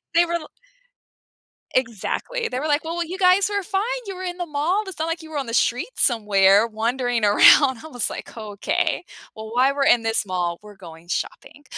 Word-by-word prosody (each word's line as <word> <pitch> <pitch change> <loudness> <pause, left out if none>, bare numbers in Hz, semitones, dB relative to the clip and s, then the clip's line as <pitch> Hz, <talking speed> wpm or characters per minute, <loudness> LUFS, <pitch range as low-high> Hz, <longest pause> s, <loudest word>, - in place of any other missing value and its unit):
They 340 +1 +5
were 340 - -4
l 335 -3 -3 1.3
Exactly. 255 - -2
They 250 - -3
were 300 - -3
like, 295 0 +1
"Well, 330 +1 -5
y 345 - 0
you 365 +3 -6
guys 375 +1 +4
were 405 -1 -2
fine. 385 +1 -1 0.3
You 390 - -5
were 370 - -7
in 355 -1 -4
the 355 - -3
mall. 330 +7 -1
It's 380 - -9
not 320 - 0
like 330 +1 -3
you 315 - -12
were 305 - -4
on 275 - -2
the 230 - -7
street 245 +1 +1
somewhere 205 -3 +4
wandering 235 +1 -1
around." 260 +6 +6
I - - -8
was 245 -7 -2
like, - - -8
"Okay. 210 -3 -2 0.3
Well, 220 0 -9
while 260 +3 +3
we're 280 -1 +1
in 240 -3 +4
this 225 -1 0
mall, 175 -2 -2
we're 210 0 -14
going 170 -3 -13
shopping." 290 +9 -5
260 Hz, 215 wpm, -22 LUFS, 220-340 Hz, 1.3 s, around